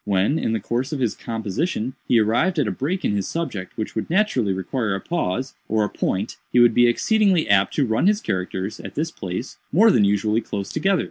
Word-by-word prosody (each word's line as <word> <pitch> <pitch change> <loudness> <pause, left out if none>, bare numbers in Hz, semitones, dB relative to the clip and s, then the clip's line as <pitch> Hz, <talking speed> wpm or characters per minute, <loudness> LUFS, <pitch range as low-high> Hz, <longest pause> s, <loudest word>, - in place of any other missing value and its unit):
When, 100 +9 +1
in 110 - -1
the 110 - 0
course 125 +7 -2
of 150 - -3
his 120 -4 0
composition, 115 - -3
he 120 - +4
arrived 120 - +2
at 145 -7 +2
a - - 0
break 170 +8 -2
in 105 - +1
his 100 -2 -1
subject 105 - -4
which 110 - -4
would 110 - -3
naturally 165 - +2
require 95 +3 -2
a - - -3
pause, 130 - -2 0.2
or 110 0 +2
a 105 - -1
point, 100 +4 -2
he 125 - +4
would 120 -1 +6
be 120 +1 +5
exceedingly 195 - +2
apt 100 -1 +3
to 145 - +2
run 110 +9 +1
his 210 0 +3
characters, 95 - -3
at - - -9
this 160 +2 -1
place, 95 - -6
more 220 +7 +6
than 110 - +4
usually 105 +2 +2
close 100 -3 -5
together. 190 +4 +1
115 Hz, 220 wpm, -22 LUFS, 100-155 Hz, 0.2 s, would